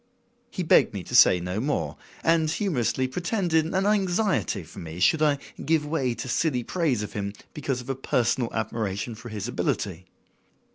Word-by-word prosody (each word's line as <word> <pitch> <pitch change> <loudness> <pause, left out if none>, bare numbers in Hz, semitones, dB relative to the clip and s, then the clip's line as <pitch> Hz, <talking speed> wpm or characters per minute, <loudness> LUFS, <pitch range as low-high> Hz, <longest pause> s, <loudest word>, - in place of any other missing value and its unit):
He 185 - -3
begged 155 -8 +4
me 95 - -4
to - - -10
say 90 - +7
no 90 +3 -3
more, 145 +5 -1 0.3
and 165 -1 +3
humorously 140 - 0
pretended 175 - 0
an 190 +3 0
anxiety 195 - +1
for - - -12
me 80 +1 -7
should 155 - +4
I 150 -2 +3 0.3
give 155 0 +2
way 135 -6 -1
to - - -6
silly 125 -1 0
praise 145 - 0
of 105 - -7
him 100 -1 -3 0.2
because 135 -4 -2
of 125 - -12
a - - 0
personal 125 -2 0
admiration 110 0 -2
for 120 +2 -10
his 105 -1 -4
ability. 95 -6 -2
130 Hz, 175 wpm, -26 LUFS, 110-165 Hz, 0.3 s, say